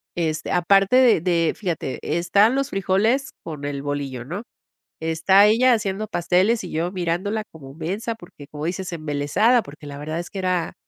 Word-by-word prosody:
este, 155 -3 -2
aparte 195 +5 +3
de 250 -9 +5
de 170 -2 +1
fíjate, 170 -9 -3 0.2
están 200 +7 +3
los 275 0 -1
frijoles 215 +8 +1
con 150 -3 -7
el 145 -1 -3
bolillo, 140 -4 -4
¿no?, 180 - -5 0.6
está 165 +5 +4
ella 240 +4 +4
haciendo 215 -2 -1
pasteles 190 +4 +1
y 180 - -7
yo 170 +3 -2
mirándola 190 +4 -2
como 135 -4 -12
mensa 195 +9 -3
porque, 175 -8 -14
como 150 +1 -5
dices, 185 +1 -4
embelesada, 155 - +1
porque 150 -3 -12
la 140 -1 -7
verdad 155 +3 -4
es 175 - -5
que 195 - -7
era 180 -3 -1
175 Hz, 170 wpm, -22 LUFS, 155-205 Hz, 0.6 s, de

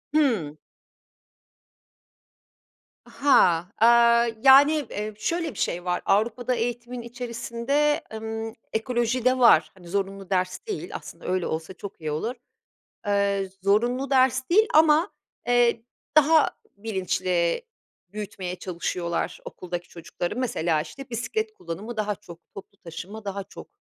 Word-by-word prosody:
Hımm. 215 - +1 2.5
Ha. 180 - +4
Aaa, 235 +1 +5 0.2
yani, 285 +3 +7
eee, 210 +1 -4
şöyle 330 +5 -2
bir - - -10
şey 175 +1 -1
var, 180 0 -1
Avrupa'da 235 +5 +1
eğitimin 240 +1 -3
içerisinde, 245 +5 -1
ımm, 225 0 -5 0.2
ekoloji 240 +1 0
de 255 0 +4
var. 160 -10 +6
Hani, 180 -2 -16
zorunlu 195 0 -3
ders 185 -1 0
değil. 425 - -5
Aslında - - -9
öyle 185 -1 0
olsa 160 +3 -4
çok 195 -1 -10
iyi 155 -1 -3
olur. 225 +12 -2 0.7
Eee, 200 -1 +1
zorunlu 240 +7 +1
ders 260 -1 +3
değil 430 +5 +5
ama, 315 +3 +5 0.4
eee, 240 -1 +3 0.3
daha 310 +1 +6 0.3
bilinçli 185 - -1 0.5
büyütmeye 200 -2 -6
çalışıyorlar 170 -1 -3
okuldaki 175 -1 -6
çocukları. 175 +4 -5
Mesela, 170 -11 0
işte, 275 - -9
bisiklet 435 - -2
kullanımı 210 - -7
daha 210 -1 -1
çok, 170 -3 -13 0.2
toplu 200 0 -11
taşıma 190 +5 -9
daha 200 0 -4
çok. - - -12
220 Hz, 120 wpm, -25 LUFS, 185-250 Hz, 2.5 s, yani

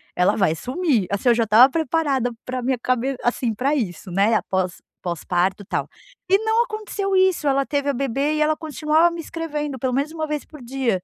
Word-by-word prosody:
ela 180 - +3
vai 190 -6 +2
sumir. 255 - 0
Assim, 200 +5 +1
eu 235 - +5
já 230 - +2
estava 225 +4 +7
preparada 285 -5 0
para 255 0 -3
a - - -4
minha 255 0 -1
cabe 255 +2 0
assim 240 -1 0
pra 270 +7 0
isso, 190 - -3
né, 200 +5 +3
após 185 -4 -1 0.2
pós-parto 180 +3 -1
e - - -18
tal. - - -2 0.5
E 390 - +7
não 445 +2 +3
aconteceu 425 -3 -4
isso. 375 -4 +3
Ela 275 -1 +2
teve 285 -1 -1
a - - +1
bebê 275 +3 -1
e 305 - 0
ela 305 +1 +3
continuava 310 +2 +2
me 340 - -7
escrevendo, 300 -4 -4
pelo 255 +1 -1
menos 280 +4 -1
1 315 -1 -2
vez 300 -1 -4
por 300 -3 -13
dia. 240 -6 -1
270 Hz, 210 wpm, -22 LUFS, 230-310 Hz, 0.5 s, estava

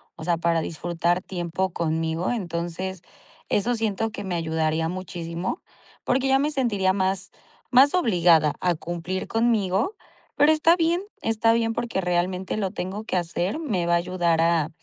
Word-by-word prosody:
o - - -9
sea, 170 0 +1
para 165 -1 +1
disfrutar 170 +2 -1
tiempo 180 0 -3
conmigo. 160 +1 -1
Entonces 180 -3 -3 0.5
eso 240 +4 +1
siento 225 -1 -1
que - - -6
me 185 -2 -3
ayudaría 160 -1 0
muchísimo 175 - -4 0.4
porque 260 +1 +1
ya 270 0 +4
me 290 +2 +1
sentiría 210 -9 +1
más 190 0 -1 0.4
más 265 +3 +6
obligada 175 - +4
a 180 -1 +2
cumplir 175 +3 -4
conmigo. 225 - +1 0.4
Pero 290 +2 +5
está 315 +2 +4
bien, 340 +1 +1 0.2
está 225 0 +2
bien, 225 0 +1
porque 230 -5 -2
realmente 180 +2 -1
lo 195 -3 -1
tengo 195 +2 -5
que 220 - -3
hacer. 180 - -1
Me 205 - -1
va 170 - +1
a 170 - +5
ayudar 170 -2 +1
a 165 -2 +2
185 Hz, 160 wpm, -24 LUFS, 170-225 Hz, 0.5 s, más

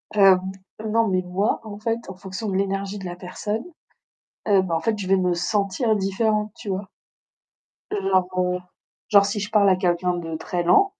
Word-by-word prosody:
Hem, 195 -2 +7 0.5
non, 225 +1 +3
mais 185 -1 +1
moi, 185 +4 0
en 205 -2 -8
fait, 230 +1 -1
en 190 - -7
fonction 190 +3 -5
de 190 - -2
l'énergie 195 +1 -1
de 195 - -7
la 175 -1 -5
personne, 205 +5 -4 0.9
heu, 195 -2 +5
bah 170 -3 -2
en - - -1
fait, 220 +3 0
je 190 - -4
vais 195 +1 +4
me 180 -1 +1
sentir 200 +5 +1
différente, 210 +2 0
tu 205 - -9
vois? 190 +1 -3 1.0
Genre, 190 -2 +2
heu, 180 0 +1 0.5
genre 200 -2 +6
si 205 +1 -2
je 210 - -4
parle 205 -2 +4
à 185 - +5
quelqu'un 180 -1 +1
de 165 -2 -4
très 175 +2 -2
lent, 285 - +4
195 Hz, 190 wpm, -23 LUFS, 180-210 Hz, 1.0 s, Hem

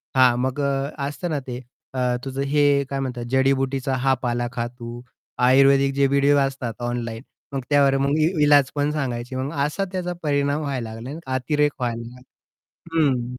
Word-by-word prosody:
हां, 130 -2 +6
मग 130 +2 -1
अ, 140 0 0 0.2
असतं 175 +5 -4
ना 150 -3 -1
ते 125 -1 -4 0.3
अ, 130 - -3 0.3
तुझं 135 0 -3
हे 145 0 +3
काय 140 - -2
म्हणतात 125 -3 -3
जडीबुटीचा 135 0 +1
हा 135 - +4
पाला 120 0 0
खा 120 0 -2
तू. 120 -1 -9 0.4
आयुर्वेदिक 135 +2 +5
जे 140 0 +3
व्हिडिओ 140 +1 +3
असतात 135 -4 -1
ऑनलाईन, 120 -1 -3 0.3
मग 135 - -1
त्यावर 140 -2 +4
मग 140 +2 +1
इ 155 - +4 0.2
इलाज 145 -2 +5
पण 145 0 +1
सांगायची 130 -4 -3
मग 130 +3 -2
असा 195 +7 -2
त्याचा 180 -1 -3
परिणाम 145 0 +1
व्हायला 135 -6 -3
लागला 110 +1 -8
नाही 150 - -5
का 130 - -4
अतिरेक 145 +3 +1
व्हायला 120 -2 -2
लागला. 125 +2 -11 0.8
हं. 125 -3 0
135 Hz, 180 wpm, -23 LUFS, 125-145 Hz, 0.8 s, हां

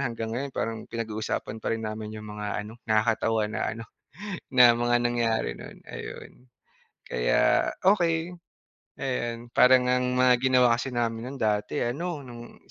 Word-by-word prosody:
hanggang 115 -2 -3
ngayon 135 +4 -3
parang 115 0 -2
pinag-uusapan 110 -1 -4
pa - - -3
rin 110 - -7
namin 110 0 -5
yung 110 - -8
mga 105 0 -5 0.2
ano, 110 +3 -11
nakakatawa 110 0 +2
na - - -3 0.2
ano, 115 - -7 0.7
na 125 -2 +8
mga 120 0 +2
nangyari 115 - 0
noon, - - -11
ayun. - - -8 0.8
Kaya - - +2 0.2
okey, 175 -3 +2 0.7
ayon, 120 -3 -3
parang 125 0 +6
ang 125 0 +1
mga 125 0 +6
ginawa 125 -2 +4
kasi 135 - -3
namin 115 0 -1
no'n 135 - -8
dati, 105 -1 0
ano, 150 +6 -3
nung 120 -1 -11
120 Hz, 145 wpm, -27 LUFS, 110-125 Hz, 0.8 s, na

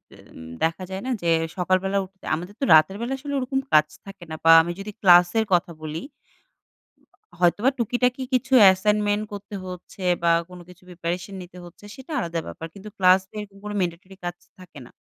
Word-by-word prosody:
তেম - - -18 0.3
দেখা 165 +3 -1
যায় 190 +1 -5
না - - -2
যে 170 - +1 0.3
সকাল 185 0 +2
বেলা 195 +1 0
উঠতে 190 0 -19
আমাদের 175 +5 -7
তো - - +1
রাতের 155 +5 +5
বেলা 240 +3 -2
আসলে 285 +1 -6
ওরকম 265 +1 -1
কাজ 155 0 +6 0.2
থাকে 195 -3 -11
না 160 - -4
বা 165 - +6
আমি 170 +1 -4
যদি 205 +2 -6
ক্লাসের 180 +3 +5
কথা 175 -1 +2
বলি 155 +2 -5 1.4
হয়তোবা 185 +8 +3
টুকিটাকি 250 +3 0
কিছু 265 +1 0
অ্যাসাইনমেন্ট 205 +2 +3
করতে 205 0 -8
হচ্ছে 180 +1 -9 0.2
বা 170 - +4 0.2
কোনো 180 -1 -11
কিছু 180 0 -17
প্রিপারেশন 180 +2 -5
নিতে 180 0 -12
হচ্ছে 175 +4 -14
সেটা 265 +4 -12
আলাদা 170 -6 -3
ব্যাপার। 165 - -7
কিন্তু 200 +2 -10
ক্লাসের 190 +3 +2 0.2
কোনো 210 0 -5
ম্যান্ডেটরি 180 +1 -4
কাজ 175 0 -3 0.2
থাকে 180 -5 -13
না। - - -16
185 Hz, 180 wpm, -23 LUFS, 175-210 Hz, 1.4 s, কাজ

